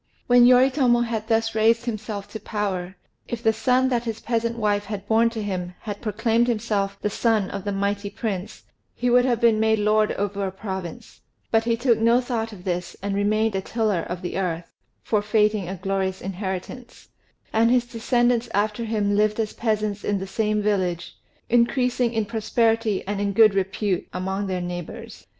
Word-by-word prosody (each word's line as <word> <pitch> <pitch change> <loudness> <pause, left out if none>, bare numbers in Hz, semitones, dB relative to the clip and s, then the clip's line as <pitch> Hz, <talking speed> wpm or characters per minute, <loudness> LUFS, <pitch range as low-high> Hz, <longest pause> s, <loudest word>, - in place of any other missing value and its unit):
When 245 0 +6
Yoritomo 255 -1 +4
had 225 -2 -2
thus 225 0 +1
raised 225 +2 +3
himself 215 -3 -4
to 220 - -7
power, 195 -4 -3 0.3
if 235 -1 -5
the 220 - +4
son 250 +4 +2
that 240 -2 0
his 225 -1 -3
peasant 230 0 -1
wife 205 -2 0
had 205 -1 -6
born 225 +1 +4
to 225 -2 -5
him 180 -3 -4
had 205 -2 -6
proclaimed 225 +2 +1
himself 210 -4 -1
the 210 - +1
son 220 -3 +1
of 200 0 -6
the 205 - -1
mighty 200 +1 -1
prince, 200 -2 -5 0.3
he 245 0 0
would 245 +1 +5
have 240 -3 +1
been 230 -3 +4
made 220 0 +3
lord 215 0 +2
over 200 0 -2
a - - -4
province; 190 -3 -7 0.3
but 225 0 +3
he 230 -1 +1
took 240 -1 +2
no 230 +2 +4
thought 235 -3 -3
of 190 -4 -11
this, 180 -2 -3
and 200 0 -1
remained 215 +2 +1
a 190 - 0
tiller 215 -4 0
of 180 +2 -6
the 180 - -3
earth, 170 -3 -3 0.3
forfeiting 210 -2 +1
a 190 - -4
glorious 190 0 -2
inheritance; 195 +5 -6 0.4
and 225 +1 +4
his 245 0 +3
descendants 240 0 +1
after 210 +3 0
him 210 -2 0
lived 210 +1 +2
as 215 -2 -1
peasants 215 -2 -1
in 205 - 0
the 190 - -4
same 210 +1 -1
village, 185 -5 -1 0.3
increasing 245 0 +2
in 225 -2 -1
prosperity 225 -1 0
and 200 +1 -2
in 200 0 0
good 215 0 +6
repute 195 -1 -1
among 190 +2 -2
their 185 -1 -2
neighbours. 175 -1 -7
215 Hz, 180 wpm, -24 LUFS, 195-230 Hz, 0.4 s, When